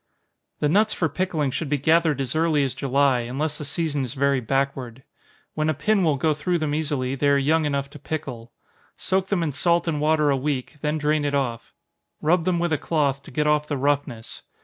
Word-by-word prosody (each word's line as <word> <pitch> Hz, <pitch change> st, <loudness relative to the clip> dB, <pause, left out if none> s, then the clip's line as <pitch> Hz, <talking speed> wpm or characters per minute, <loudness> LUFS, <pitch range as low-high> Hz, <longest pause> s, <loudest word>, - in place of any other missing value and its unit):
_ -, -, -48 dB
The 150 Hz, -, +3 dB
nuts 210 Hz, +7 st, +2 dB
for 165 Hz, -, +1 dB
pickling 155 Hz, -3 st, -1 dB
should 155 Hz, +2 st, -3 dB
be 145 Hz, -, +1 dB
gathered 160 Hz, +1 st, +2 dB
as 130 Hz, 0 st, -3 dB
early 155 Hz, -2 st, +2 dB
as 135 Hz, -2 st, -1 dB
July, 135 Hz, -1 st, +2 dB
unless 140 Hz, +6 st, -3 dB
the 150 Hz, -, -4 dB
season 150 Hz, -1 st, -1 dB
is 125 Hz, +2 st, -5 dB
very 140 Hz, 0 st, +2 dB
backward. 130 Hz, 0 st, -2 dB, 0.5 s
When 155 Hz, 0 st, 0 dB
a 155 Hz, -, 0 dB
pin 195 Hz, +7 st, +1 dB
will 155 Hz, -4 st, +3 dB
go 155 Hz, +3 st, +1 dB
through 175 Hz, +4 st, -1 dB
them 155 Hz, -3 st, -2 dB
easily, 145 Hz, -4 st, -1 dB
they 140 Hz, +1 st, +1 dB
are 140 Hz, -, +4 dB
young 155 Hz, +3 st, +2 dB
enough 140 Hz, -1 st, -1 dB
to -, -, -11 dB
pickle. 120 Hz, -7 st, -6 dB, 0.5 s
Soak 190 Hz, 0 st, 0 dB
them 190 Hz, -4 st, 0 dB
in 155 Hz, -, -1 dB
salt 170 Hz, +4 st, +1 dB
and 150 Hz, -3 st, -1 dB
water 150 Hz, -1 st, +3 dB
a 135 Hz, -, +2 dB
week 140 Hz, +1 st, -3 dB
then 150 Hz, 0 st, 0 dB
drain 150 Hz, 0 st, +1 dB
it 145 Hz, -1 st, 0 dB
off. 120 Hz, -4 st, -3 dB, 0.4 s
Rub 165 Hz, +2 st, +2 dB
them 180 Hz, -2 st, +1 dB
with 170 Hz, -1 st, 0 dB
a 155 Hz, -, 0 dB
cloth, 140 Hz, -4 st, 0 dB
to -, -, -14 dB
get 150 Hz, +4 st, -1 dB
off 150 Hz, 0 st, +2 dB
the 145 Hz, -, -2 dB
roughness. 140 Hz, -4 st, -2 dB
150 Hz, 220 wpm, -24 LUFS, 135-160 Hz, 0.5 s, are